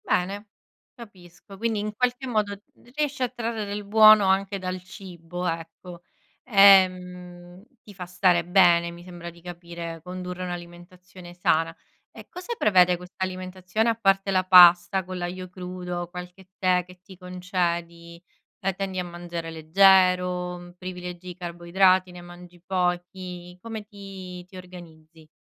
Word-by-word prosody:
Bene, 200 Hz, +4 st, -1 dB, 0.5 s
capisco. 195 Hz, -4 st, -14 dB
Quindi, 225 Hz, 0 st, -1 dB
in 210 Hz, +1 st, -4 dB
qualche 250 Hz, +3 st, -1 dB
modo, 215 Hz, -4 st, -1 dB
r 200 Hz, -, -12 dB, 0.3 s
riesci 295 Hz, -3 st, -2 dB
a 250 Hz, -, 0 dB
trarre 230 Hz, -3 st, -4 dB
del 205 Hz, +1 st, -5 dB
buono 215 Hz, 0 st, +7 dB
anche 195 Hz, +1 st, +1 dB
dal 185 Hz, -1 st, -5 dB
cibo, 180 Hz, -2 st, -8 dB
ecco. 165 Hz, +1 st, -7 dB, 0.4 s
Ehm, 180 Hz, -3 st, +3 dB, 0.2 s
ti 205 Hz, -, -14 dB
fa 180 Hz, -2 st, -8 dB
stare 175 Hz, -1 st, +2 dB
bene, 175 Hz, -1 st, +4 dB
mi 170 Hz, 0 st, -12 dB
sembra 175 Hz, -1 st, -9 dB
di 170 Hz, 0 st, -16 dB
capire, 170 Hz, -1 st, -8 dB
condurre 180 Hz, 0 st, -6 dB
un'alimentazione 175 Hz, +1 st, -10 dB
sana. 165 Hz, -2 st, +1 dB, 0.4 s
E -, -, -13 dB
cosa 365 Hz, +7 st, -6 dB
prevede 180 Hz, -3 st, +4 dB
quest'alimentazione, 185 Hz, +3 st, -3 dB
a 230 Hz, -, +1 dB
parte 195 Hz, -2 st, +1 dB
la 185 Hz, -1 st, +2 dB
pasta 180 Hz, 0 st, +7 dB
con 185 Hz, 0 st, -6 dB
l'aglio 180 Hz, +1 st, -5 dB
crudo, 180 Hz, -1 st, -6 dB
qualche 180 Hz, +1 st, -10 dB
tè 185 Hz, -2 st, +2 dB
che 180 Hz, 0 st, -16 dB
ti 190 Hz, -1 st, -14 dB
concedi? 175 Hz, -2 st, -4 dB, 0.4 s
La 195 Hz, -, 0 dB
tendi 190 Hz, 0 st, -4 dB
a -, -, -1 dB
mangiare 175 Hz, -1 st, -7 dB
leggero, 180 Hz, +1 st, +2 dB
privilegi 180 Hz, 0 st, -8 dB
i 180 Hz, -, -8 dB
carboidrati, 180 Hz, +1 st, +1 dB
ne 180 Hz, 0 st, -11 dB
mangi 175 Hz, 0 st, -14 dB
pochi? 180 Hz, -1 st, -3 dB
Come 220 Hz, -1 st, -7 dB
ti 195 Hz, -3 st, -10 dB
ti 185 Hz, +1 st, -14 dB
organizzi? 165 Hz, -3 st, -14 dB
180 Hz, 140 wpm, -25 LUFS, 175-195 Hz, 0.5 s, buono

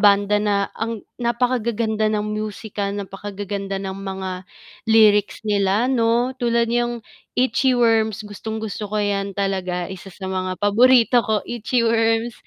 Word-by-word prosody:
banda 205 Hz, 0 st, +4 dB
na 205 Hz, -1 st, +1 dB, 0.2 s
ang 225 Hz, -1 st, -4 dB, 0.2 s
napakagaganda 235 Hz, -3 st, 0 dB
ng 210 Hz, -1 st, -1 dB
musika, 210 Hz, -1 st, -4 dB
napakagaganda 200 Hz, 0 st, -5 dB
ng 195 Hz, 0 st, -4 dB
mga 190 Hz, -1 st, -4 dB, 0.6 s
lyrics 215 Hz, -1 st, +4 dB
nila 205 Hz, +2 st, +2 dB
'no. 240 Hz, +1 st, +2 dB
Tulad 235 Hz, -1 st, +2 dB
niyang 240 Hz, 0 st, 0 dB, 0.4 s
Itchyworms, 230 Hz, -4 st, +2 dB
gustong-gusto 220 Hz, 0 st, -5 dB
ko 215 Hz, -, -2 dB
yan 200 Hz, -1 st, -1 dB
talaga, 185 Hz, -3 st, -2 dB
isa 190 Hz, 0 st, -9 dB
sa 190 Hz, -, -10 dB
mga 185 Hz, -1 st, -2 dB
paborito 240 Hz, +3 st, +5 dB
ko 220 Hz, -3 st, -1 dB
Itchyworms, 230 Hz, 0 st, +1 dB
215 Hz, 120 wpm, -21 LUFS, 200-230 Hz, 0.6 s, paborito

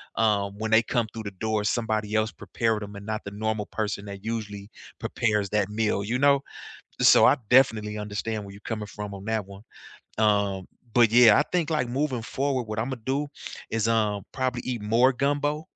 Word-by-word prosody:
um, 100 Hz, -2 st, +1 dB
when 110 Hz, 0 st, -2 dB
they 110 Hz, +1 st, +6 dB
come 120 Hz, -1 st, 0 dB
through 110 Hz, -1 st, -6 dB
the 100 Hz, -, -5 dB
door, 110 Hz, -1 st, 0 dB
somebody 110 Hz, -1 st, -1 dB
else 110 Hz, +1 st, +1 dB
prepared 110 Hz, -2 st, -2 dB
them 100 Hz, 0 st, -9 dB
and 100 Hz, 0 st, -9 dB
not 110 Hz, 0 st, -3 dB
the 100 Hz, -, -6 dB
normal 110 Hz, 0 st, -2 dB
person 105 Hz, -2 st, -3 dB
that 100 Hz, 0 st, -8 dB
usually 105 Hz, -3 st, -5 dB, 0.3 s
prepares 105 Hz, -3 st, 0 dB
that 105 Hz, -1 st, 0 dB
meal, 105 Hz, -2 st, 0 dB
you 120 Hz, +5 st, -1 dB
know? 140 Hz, 0 st, +5 dB, 0.6 s
So, -, -, +7 dB
I -, -, +6 dB
definitely 110 Hz, -5 st, +3 dB
understand 105 Hz, +1 st, -4 dB
where 100 Hz, -, -10 dB
you're 100 Hz, -, -13 dB
coming 105 Hz, -1 st, -5 dB
from 105 Hz, -1 st, -7 dB
on 100 Hz, +1 st, -9 dB
that 110 Hz, -3 st, -1 dB
one, 100 Hz, +2 st, -12 dB, 0.6 s
um, 100 Hz, -3 st, +2 dB, 0.3 s
but 120 Hz, -3 st, +5 dB
yeah, 115 Hz, -3 st, +7 dB
I -, -, +3 dB
think 170 Hz, -3 st, +1 dB
like 150 Hz, -6 st, 0 dB
moving 130 Hz, -2 st, -1 dB
forward, 130 Hz, +1 st, -1 dB
what 105 Hz, -1 st, -5 dB
Imma 125 Hz, +2 st, -2 dB
do 140 Hz, +3 st, -1 dB, 0.4 s
is, 115 Hz, 0 st, 0 dB
um, 105 Hz, -3 st, +1 dB
probably 130 Hz, -2 st, -1 dB
eat 120 Hz, -4 st, -3 dB
more 120 Hz, +5 st, +3 dB
gumbo, 145 Hz, +3 st, 0 dB
110 Hz, 195 wpm, -26 LUFS, 105-120 Hz, 0.6 s, So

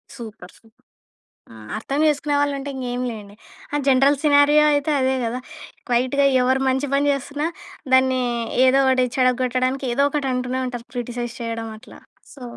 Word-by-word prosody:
Super. 220 Hz, -7 st, -11 dB
Super. 225 Hz, -1 st, -28 dB, 0.7 s
ఆ! -, -, -13 dB, 0.2 s
అర్థం 275 Hz, +6 st, -3 dB
చేసుకునే 290 Hz, 0 st, 0 dB
వాళ్ళుంటే, 285 Hz, -1 st, -1 dB
ఇంగేమి 250 Hz, -1 st, -3 dB
లేండి. 205 Hz, -2 st, -10 dB, 0.4 s
ఆహ్, 290 Hz, -, 0 dB
జనరల్ 270 Hz, +2 st, +4 dB
సినారియో 290 Hz, +1 st, +5 dB
అయితే 290 Hz, +1 st, 0 dB
అదే 260 Hz, 0 st, +1 dB
గదా! 240 Hz, +2 st, -3 dB, 0.5 s
క్వైట్‌గా 255 Hz, +4 st, +2 dB, 0.2 s
ఎవ్వరు 260 Hz, +1 st, +1 dB
మంచి 265 Hz, +2 st, 0 dB
పని 285 Hz, +1 st, +2 dB
జేస్తున్నా, 285 Hz, +2 st, -3 dB, 0.5 s
దాన్నీ, 260 Hz, 0 st, +4 dB, 0.4 s
ఏదో 265 Hz, +1 st, +4 dB
ఒకటి 255 Hz, -1 st, +3 dB
చెడగొట్టడానికి, 255 Hz, +1 st, +1 dB
ఏదో 280 Hz, +3 st, +2 dB
ఒకటంటూనే 260 Hz, -3 st, -2 dB
ఉంటారు. 240 Hz, -1 st, -7 dB
క్రిటిసైజ్ 240 Hz, 0 st, -5 dB
చేయడం 230 Hz, -1 st, -4 dB
అట్లా. 230 Hz, -, -15 dB, 0.3 s
సో 280 Hz, -, -15 dB
260 Hz, 145 wpm, -21 LUFS, 245-280 Hz, 0.7 s, సినారియో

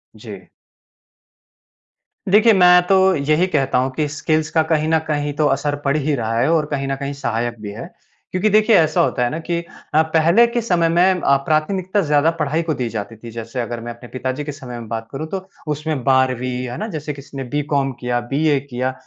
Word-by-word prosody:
जी। -, -, -11 dB, 1.8 s
देखिए 215 Hz, +3 st, +6 dB
मैं 180 Hz, -2 st, +6 dB
तो 195 Hz, -, +4 dB, 0.2 s
यही 155 Hz, +4 st, +2 dB
कहता 140 Hz, -8 st, 0 dB
हूँ 130 Hz, +1 st, +1 dB
कि 150 Hz, +1 st, 0 dB
स्किल्स 155 Hz, +1 st, -1 dB
का 160 Hz, -, +3 dB
कहीं 155 Hz, -1 st, +2 dB
न 160 Hz, -, +4 dB
कहीं 145 Hz, -1 st, -1 dB
तो 150 Hz, +1 st, 0 dB
असर 145 Hz, +1 st, 0 dB
पड़ 140 Hz, +1 st, +2 dB
ही 150 Hz, 0 st, 0 dB
रहा 115 Hz, -2 st, -1 dB
है, 120 Hz, -, +2 dB
और 160 Hz, -2 st, +2 dB
कहीं 140 Hz, -1 st, -2 dB
न 135 Hz, -, -1 dB
कहीं 140 Hz, +1 st, -5 dB
सहायक 120 Hz, -3 st, -3 dB
भी 105 Hz, -, -6 dB
है। 110 Hz, +3 st, -7 dB, 0.5 s
क्योंकि 185 Hz, +4 st, +1 dB
देखिए 215 Hz, +1 st, +4 dB
ऐसा 160 Hz, +2 st, +3 dB
होता 125 Hz, -6 st, +1 dB
है 120 Hz, -, +1 dB
ना 155 Hz, -, -4 dB
कि 170 Hz, +1 st, -2 dB, 0.3 s
अ, 155 Hz, -, +5 dB
पहले 165 Hz, +7 st, +4 dB
के 235 Hz, 0 st, -1 dB
समय 175 Hz, -7 st, +1 dB
में 180 Hz, +2 st, +3 dB
अ, 140 Hz, -, +4 dB
प्राथमिकता 185 Hz, +6 st, 0 dB
ज़्यादा 150 Hz, -1 st, +2 dB
पढ़ाई 150 Hz, +2 st, 0 dB
को 160 Hz, -1 st, -1 dB
दी 125 Hz, -4 st, -3 dB
जाती 110 Hz, 0 st, -5 dB
थी। 115 Hz, +1 st, -10 dB
जैसे 115 Hz, +2 st, -6 dB
अगर 120 Hz, 0 st, -4 dB
मैं 120 Hz, +1 st, -6 dB
अपने 120 Hz, +1 st, -14 dB
पिताजी 130 Hz, +2 st, -4 dB
के 150 Hz, -, -5 dB
समय 130 Hz, -4 st, -8 dB
में 115 Hz, -, -9 dB
बात 115 Hz, 0 st, -4 dB
करूँ 150 Hz, +4 st, -5 dB
तो 190 Hz, -1 st, -4 dB, 0.3 s
उसमें 150 Hz, -2 st, -3 dB
12वीं 130 Hz, -1 st, +2 dB, 0.2 s
है 120 Hz, +1 st, -6 dB
ना? 215 Hz, -, -4 dB
जैसे 155 Hz, -6 st, -5 dB
किसी 140 Hz, 0 st, -11 dB
ने 135 Hz, -, -3 dB
बीकॉम 140 Hz, -2 st, 0 dB
किया 125 Hz, -1 st, -1 dB
बीए 150 Hz, 0 st, +2 dB
किया। 130 Hz, -1 st, -3 dB
145 Hz, 215 wpm, -19 LUFS, 130-160 Hz, 1.8 s, देखिए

